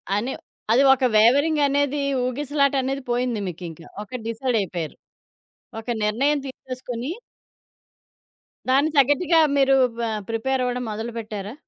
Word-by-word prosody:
అని 235 Hz, +6 st, -1 dB, 0.4 s
అది 250 Hz, +4 st, +5 dB
ఒక 265 Hz, -, -2 dB
వేవరింగ్ 285 Hz, +8 st, +4 dB
అనేది, 285 Hz, +1 st, 0 dB, 0.2 s
ఊగిసలాటనేది 275 Hz, 0 st, 0 dB
పోయింది 245 Hz, -2 st, 0 dB
మీకింక. 170 Hz, -2 st, -7 dB, 0.2 s
ఒకటి 240 Hz, +4 st, -7 dB
డిసైడైపోయారు. 220 Hz, -, -2 dB, 0.8 s
ఒక 225 Hz, -, -12 dB, 0.2 s
నిర్ణయం 270 Hz, +8 st, +1 dB
తీసేసుకొని 255 Hz, 0 st, -6 dB, 1.6 s
దాన్ని 275 Hz, +4 st, +4 dB
తగ్గట్టుగా 290 Hz, +5 st, +4 dB, 0.2 s
మీరు 270 Hz, -1 st, +4 dB, 0.2 s
ప -, -, -3 dB, 0.3 s
ప్రిపేరవ్వడం 250 Hz, +1 st, -1 dB
మొదలుపెట్టారా? 220 Hz, -2 st, -5 dB
255 Hz, 100 wpm, -23 LUFS, 225-275 Hz, 1.6 s, అది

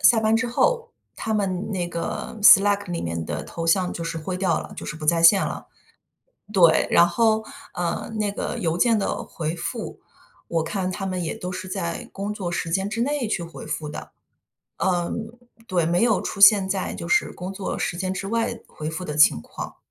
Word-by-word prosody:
下 230 Hz, -3 st, +6 dB
班 220 Hz, +1 st, +3 dB
之 225 Hz, -, 0 dB
后， 470 Hz, -, +1 dB, 0.3 s
他 220 Hz, -, -3 dB
们 195 Hz, -1 st, -1 dB
那 180 Hz, -4 st, -2 dB
个， 170 Hz, +6 st, -4 dB
Slack 205 Hz, -1 st, +6 dB
里 170 Hz, -, -2 dB
面 85 Hz, -1 st, -3 dB
的 75 Hz, -1 st, -4 dB
头 165 Hz, 0 st, -6 dB
像 180 Hz, +1 st, +3 dB
就 170 Hz, -, -5 dB
是 165 Hz, 0 st, -3 dB
灰 180 Hz, +4 st, -4 dB
掉 185 Hz, -3 st, +1 dB
了， -, -, -9 dB
就 -, -, -7 dB
是 150 Hz, -, -5 dB
不 155 Hz, -1 st, -7 dB
在 165 Hz, +1 st, +3 dB
线 190 Hz, +4 st, +7 dB
了。 -, -, -6 dB, 0.8 s
对， 170 Hz, -6 st, +4 dB
然 170 Hz, -, +6 dB
后， 220 Hz, +4 st, +2 dB, 0.3 s
呃， 175 Hz, +5 st, -2 dB
那 205 Hz, -1 st, 0 dB
个 -, -, -4 dB
邮 165 Hz, 0 st, -1 dB
件 230 Hz, -1 st, +4 dB
的 195 Hz, -, -2 dB
回 160 Hz, 0 st, -4 dB
复， 170 Hz, -, -5 dB, 0.5 s
我 165 Hz, -1 st, 0 dB
看 185 Hz, +2 st, -2 dB
他 195 Hz, +1 st, -4 dB
们 185 Hz, -2 st, -2 dB
也 160 Hz, -, -3 dB
都 180 Hz, 0 st, -5 dB
是 185 Hz, +1 st, -6 dB
在 175 Hz, -3 st, -4 dB
工 200 Hz, +2 st, -4 dB
作 190 Hz, -4 st, -4 dB
时 170 Hz, -1 st, -3 dB
间 190 Hz, +3 st, 0 dB
之 225 Hz, +3 st, -2 dB
内 275 Hz, -3 st, -1 dB
去 180 Hz, -, -1 dB
回 165 Hz, -1 st, -9 dB
复 150 Hz, -1 st, -4 dB
的。 -, -, -8 dB, 0.7 s
嗯， 190 Hz, +6 st, -2 dB, 0.3 s
对， 175 Hz, -4 st, +1 dB
没 175 Hz, +4 st, +2 dB
有 225 Hz, -4 st, +3 dB
出 200 Hz, -, -5 dB
现 195 Hz, -1 st, +8 dB
在 190 Hz, -1 st, -2 dB
就 170 Hz, -, -6 dB
是 175 Hz, -, +2 dB
工 180 Hz, +2 st, -6 dB
作 195 Hz, 0 st, -4 dB
时 170 Hz, -, -2 dB
间 185 Hz, +1 st, -2 dB
之 190 Hz, +1 st, -4 dB
外， 230 Hz, +3 st, -1 dB
回 155 Hz, +1 st, -6 dB
复 180 Hz, +3 st, -5 dB
的 150 Hz, -, -4 dB
情 150 Hz, -, +5 dB
况。 -, -, -8 dB
185 Hz, 235 characters per minute, -24 LUFS, 170-210 Hz, 0.8 s, 现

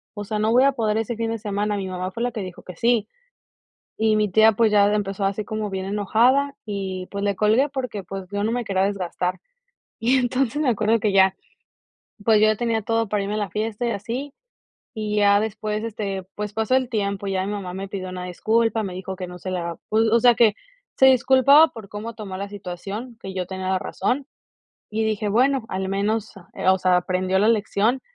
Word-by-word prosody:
o 205 Hz, -, -5 dB
sea, 210 Hz, +1 st, -3 dB
no 215 Hz, +1 st, +2 dB
voy 250 Hz, +3 st, +5 dB
a 275 Hz, -, +5 dB
poder 220 Hz, -5 st, 0 dB
ese 225 Hz, +1 st, -2 dB
fin 225 Hz, 0 st, -2 dB
de 230 Hz, -, -2 dB
semana, 205 Hz, 0 st, -2 dB
mi 195 Hz, -1 st, -3 dB
mamá 185 Hz, 0 st, -4 dB
fue 230 Hz, +5 st, -4 dB
la 245 Hz, -, 0 dB
que 220 Hz, -3 st, -5 dB
dijo 185 Hz, -2 st, -8 dB
que 180 Hz, -, -10 dB
sí. 230 Hz, +1 st, +2 dB, 0.9 s
Y 220 Hz, -1 st, +2 dB
mi 210 Hz, -1 st, +2 dB
tía, 220 Hz, +3 st, +5 dB
pues, 220 Hz, 0 st, +2 dB
ya 205 Hz, 0 st, +5 dB
empezó 200 Hz, -1 st, -1 dB
así 200 Hz, +2 st, -1 dB
como 215 Hz, 0 st, -4 dB
bien 190 Hz, -1 st, -3 dB
enojada 235 Hz, +8 st, +2 dB
y, 190 Hz, -3 st, -4 dB
pues, 200 Hz, 0 st, -4 dB
le 200 Hz, -1 st, 0 dB
colgué 220 Hz, +7 st, +3 dB
porque, 250 Hz, -7 st, -4 dB
pues, 195 Hz, 0 st, -7 dB
yo 205 Hz, 0 st, -1 dB
no 220 Hz, -, 0 dB
me 245 Hz, 0 st, -1 dB
quería 195 Hz, -3 st, 0 dB
desgastar. 185 Hz, -2 st, -2 dB, 0.6 s
Y 250 Hz, +4 st, +3 dB
entonces, 255 Hz, +3 st, 0 dB
me 280 Hz, -, +2 dB
acuerdo 220 Hz, 0 st, +2 dB
que 210 Hz, -1 st, +1 dB
ya, 190 Hz, -1 st, +5 dB, 0.9 s
pues, 220 Hz, -2 st, +5 dB
yo 215 Hz, -, +6 dB
ya 215 Hz, -1 st, +3 dB
tenía 230 Hz, -1 st, -1 dB
todo 225 Hz, +1 st, 0 dB
para 205 Hz, 0 st, 0 dB
irme 200 Hz, +1 st, -3 dB
a -, -, -1 dB
la 205 Hz, -3 st, -2 dB
fiesta 215 Hz, +3 st, -2 dB
y -, -, 0 dB
así, 235 Hz, +7 st, -4 dB, 0.6 s
y 215 Hz, -2 st, -3 dB
ya 205 Hz, 0 st, +5 dB
después, 215 Hz, 0 st, -3 dB
este, 200 Hz, -4 st, -4 dB
pues, 210 Hz, 0 st, -4 dB
pasó 220 Hz, +4 st, +1 dB
el 260 Hz, -2 st, +1 dB
tiempo, 200 Hz, -3 st, -2 dB
ya 190 Hz, -1 st, -1 dB
mi 200 Hz, -, -3 dB
mamá 185 Hz, -3 st, -5 dB
me 195 Hz, +1 st, -5 dB
pidió 190 Hz, -2 st, -5 dB
una 185 Hz, 0 st, -6 dB
disculpa, 225 Hz, +5 st, +1 dB
me 190 Hz, -3 st, -4 dB
dijo 190 Hz, +1 st, -6 dB
que 185 Hz, -1 st, -6 dB
no 180 Hz, 0 st, -10 dB
se 185 Hz, -, -6 dB
la 170 Hz, -2 st, -3 dB
pues, 220 Hz, +1 st, +3 dB
o 230 Hz, -, +5 dB
sea, 240 Hz, 0 st, +5 dB
que 225 Hz, -3 st, +5 dB, 0.4 s
se 265 Hz, -, +7 dB
disculpaba 265 Hz, +4 st, +6 dB
por 215 Hz, -4 st, -11 dB
cómo 215 Hz, +3 st, -6 dB
tomó 195 Hz, -4 st, -7 dB
la 200 Hz, -, -4 dB
situación, 205 Hz, +5 st, -7 dB
que 190 Hz, -, -7 dB
yo 185 Hz, -1 st, -2 dB
tenía 190 Hz, 0 st, -5 dB
la 190 Hz, -1 st, +1 dB
razón, 250 Hz, +8 st, -2 dB, 0.6 s
y 220 Hz, +1 st, -1 dB
dije: 215 Hz, -1 st, -1 dB
"Bueno, 255 Hz, +3 st, +2 dB
al 190 Hz, 0 st, -3 dB
menos, 210 Hz, +2 st, -1 dB
ah, 190 Hz, 0 st, 0 dB
o -, -, 0 dB
sea, 185 Hz, -1 st, +3 dB
aprendió 185 Hz, +1 st, 0 dB
la 215 Hz, +3 st, +4 dB
lección". 220 Hz, +3 st, +1 dB
210 Hz, 225 wpm, -23 LUFS, 195-230 Hz, 0.9 s, se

